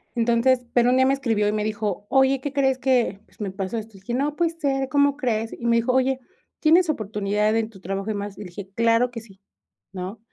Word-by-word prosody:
entonces 240 +2 +2
pero, 240 0 +4
un 250 - +3
día 260 - +5
me 270 - +3
escribió 225 -7 0
y - - +2
me 210 0 -1
dijo: 210 -2 -3
"Oye, 265 0 +3
¿qué 285 - -3
crees?, 265 -2 +1
que, 250 -7 +1
pues, - - -28
me 205 -3 -3
pasó 190 +3 -4
esto", 220 -1 -7
dije: 195 +5 -7
"No, 290 +3 -1
puede 335 0 +1
ser, 275 -5 -1
¿cómo 285 0 +3
crees?". 225 -5 -1
Y 235 - -8
me 235 - +4
dijo: 235 +2 +1
"Oye, 260 0 +2 0.4
¿tienes 330 +2 +4
oportunidad 210 -3 0
en 225 -1 0
tu 200 -4 -15
trabajo 195 +2 -4
y - - 0
demás?" 205 -1 -5
Y - - -8
le 195 - -7
dije: 190 +2 -9
"Claro 230 +2 +3
que 230 - -7
sí," 195 -4 -18 0.5
¿no? 185 +4 -6
230 Hz, 240 wpm, -23 LUFS, 210-265 Hz, 0.5 s, día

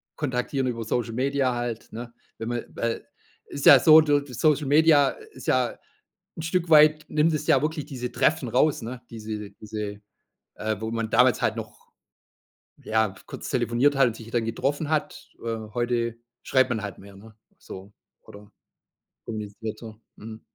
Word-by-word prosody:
kontaktieren 130 -1 -2
über 115 -2 -3
Social 115 0 -2
Media 130 +1 0
halt, 120 -2 -5
ne? 120 +1 -8 0.2
Wenn 115 +1 -5
man 120 -1 -3
weil 115 0 -3 0.4
ist 140 - -6
ja 140 - +10
so 155 +4 +8
so 145 -1 +3
Social 145 +3 +1
Media 150 -1 +5 0.2
ist - - -12
ja - - +1 0.6
'n - - -4
Stück 165 +1 -1
weit 155 0 +6
nimmt 155 +1 +2
es 150 0 -3
ja 135 - +4
wirklich 155 -1 -2
diese 125 -3 -6
Treffen 155 -4 +1
raus, 135 +3 +2
ne? 120 +2 -7
Diese 110 -3 -7
diese, 105 0 -7 0.5
äh 110 0 -2
wo 110 0 -3
man 115 -1 -2
damals 125 +1 +4
halt - - +1
noch, - - -9 0.9
ja, 110 -3 0
kurz - - -7
telefoniert 125 +5 +2
halt 135 -3 +5
und 115 - -6
sich 115 0 -11
dann 120 -2 0
getroffen 145 +6 -2
hat. 155 -1 -2
Äh, 115 -1 -2 0.2
heute 120 -1 -1 0.3
schreibt 130 -1 +2
man 110 -2 -1
halt 100 -3 -6
mehr, 100 0 -14
ne? 110 +2 -15 0.2
So, 95 +2 -11 0.3
oder 105 0 -14 0.8
kommuniziert 110 0 -6
so. 110 -2 -10 0.2
Mhm. 110 +1 -10
120 Hz, 165 wpm, -25 LUFS, 110-145 Hz, 0.9 s, ja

